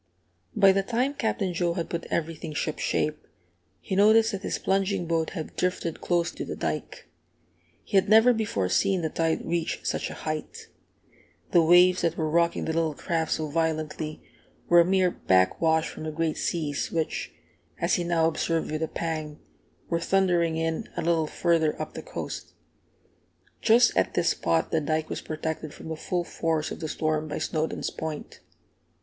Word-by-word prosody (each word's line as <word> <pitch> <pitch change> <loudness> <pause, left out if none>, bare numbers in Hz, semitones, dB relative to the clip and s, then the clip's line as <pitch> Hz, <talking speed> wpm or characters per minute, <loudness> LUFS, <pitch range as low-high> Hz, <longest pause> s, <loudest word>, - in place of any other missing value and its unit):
By 195 -1 +6
the 195 +1 +2
time 245 +7 0
Captain 215 -8 -1
Joe 170 0 0
had 170 - -2
put 170 -1 -3
everything 160 -1 -3
shipshape, 155 0 -1 0.5
he 190 - -4
noticed 220 +3 +5
that 195 -2 -4
his - - -2
plunging 195 -1 0
boat 165 -1 0
had 160 - -6
drifted 180 -3 -2
close 170 -1 +1
to - - -6
the - - -5
dike. - - -4 0.8
He 200 - 0
had 190 - +3
never 225 +3 +7
before 210 - -1
seen 185 - +1
the 160 - -1
tide 165 -1 0
reach 170 -1 -2
such - - -2
a - - -7
height. 155 -1 -5 0.8
The 175 - +6
waves 175 +2 +6
that 170 0 0
were 155 -2 -1
rocking 170 +1 +2
the 160 - -1
little 160 -2 0
craft 165 -2 -1
so 155 - -2
violently, 155 -1 -2 0.4
were 175 - +6
a 170 - +6
mere 185 -1 +3
back 95 - +2
wash 160 -1 +3
from - - -9
the 155 - -3
great 160 0 -1
seas 150 -4 -2
which, 160 -2 -2 0.5
as - - +1
he 175 - +2
now 170 -1 +2
observed 165 0 0
with 155 0 -2
a 160 - 0
pang, 155 -3 -4 0.5
were 170 - 0
thundering 175 -3 +2
in 165 0 -2
a - - -1
little 165 -1 +2
further 165 -2 +1
up - - -5
the - - -6
coast. - - -6 1.1
Just 235 +2 +5
at - - +1
this 175 -1 +2
spot 85 -1 0
the 160 - +2
dike 155 +1 -1
was - - -3
protected 155 -1 -4
from - - -9
the 160 - -3
full 175 +2 -2
force 160 -2 -2
of - - -6
the 160 -2 -4
storm 155 0 -1
by 150 - -4
Snowdons' 160 -1 -2
Point. 160 -2 -6
165 Hz, 180 wpm, -26 LUFS, 155-180 Hz, 1.1 s, never